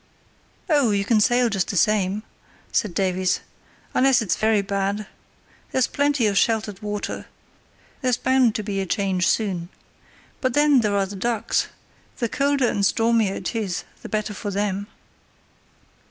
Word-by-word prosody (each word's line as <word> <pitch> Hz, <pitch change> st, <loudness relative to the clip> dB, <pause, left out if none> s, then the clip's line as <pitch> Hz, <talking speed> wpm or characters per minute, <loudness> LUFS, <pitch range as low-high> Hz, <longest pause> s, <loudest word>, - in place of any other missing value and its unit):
"Oh, 290 Hz, -8 st, +3 dB
you 200 Hz, -1 st, +1 dB
can 215 Hz, 0 st, +3 dB
sail 245 Hz, +3 st, +3 dB
just 195 Hz, -5 st, 0 dB
the 195 Hz, -, -2 dB
same," 205 Hz, +1 st, +2 dB, 0.5 s
said 210 Hz, -8 st, 0 dB
Davies, 185 Hz, -1 st, +1 dB, 0.5 s
"unless 265 Hz, 0 st, +4 dB
it's 220 Hz, -5 st, 0 dB
very 215 Hz, -2 st, +2 dB
bad. 200 Hz, +1 st, -1 dB, 0.7 s
There's 260 Hz, -2 st, +2 dB
plenty 285 Hz, -3 st, +1 dB
of 200 Hz, -2 st, +3 dB
sheltered 215 Hz, -3 st, 0 dB
water. 210 Hz, -1 st, -4 dB, 0.7 s
There's 250 Hz, -2 st, +1 dB
bound 260 Hz, -4 st, +3 dB
to 215 Hz, -, -2 dB
be 200 Hz, -1 st, -2 dB
a 190 Hz, -, -4 dB
change 185 Hz, -1 st, 0 dB
soon. 185 Hz, -6 st, 0 dB, 0.7 s
But 255 Hz, -2 st, 0 dB
then 295 Hz, -2 st, +5 dB
there 210 Hz, -3 st, +1 dB
are 195 Hz, -, +2 dB
the 195 Hz, +1 st, -8 dB
ducks. 225 Hz, +2 st, 0 dB, 0.5 s
The 235 Hz, -, 0 dB
colder 280 Hz, -1 st, +1 dB
and 205 Hz, -, 0 dB
stormier 225 Hz, -1 st, +2 dB
it 180 Hz, -, -4 dB
is, 200 Hz, -5 st, -2 dB, 0.2 s
the -, -, -8 dB
better 215 Hz, -1 st, -2 dB
for 205 Hz, 0 st, -5 dB
them." 200 Hz, 0 st, -2 dB
210 Hz, 155 wpm, -23 LUFS, 195-240 Hz, 0.7 s, then